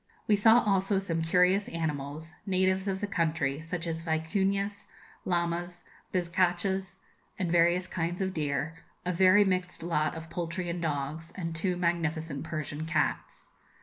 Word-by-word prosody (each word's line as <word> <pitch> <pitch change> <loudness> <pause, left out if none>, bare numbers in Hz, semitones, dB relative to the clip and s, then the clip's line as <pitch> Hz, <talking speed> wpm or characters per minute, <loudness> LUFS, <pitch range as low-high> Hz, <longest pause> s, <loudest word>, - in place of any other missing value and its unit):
We 210 - +5
saw 225 +4 +6
also 195 -1 +2
some 170 -4 -1
curious 180 +4 +3
animals, 155 0 -4
natives 190 +1 +2
of 190 -1 -1
the - - +1
country, 160 -6 0
such 165 +1 -4
as 165 -1 -3
vicuñas, 195 +5 -1 0.4
llamas, 175 0 -1 0.3
bizcachas, 185 +1 0 0.4
and 180 -3 -1
various 175 +1 +4
kinds 175 -1 -2
of 190 -1 -1
deer, 150 +1 -2 0.3
a 180 - 0
very 190 +3 +6
mixed 185 -3 -1
lot 165 -1 0
of 165 0 -7
poultry 175 +1 -3
and 170 0 -4
dogs, 155 +1 -3
and 165 -3 -4
two 180 +2 -1
magnificent 165 -4 -1
Persian 155 0 -4
cats. 155 -3 -1
175 Hz, 145 wpm, -29 LUFS, 160-190 Hz, 0.4 s, saw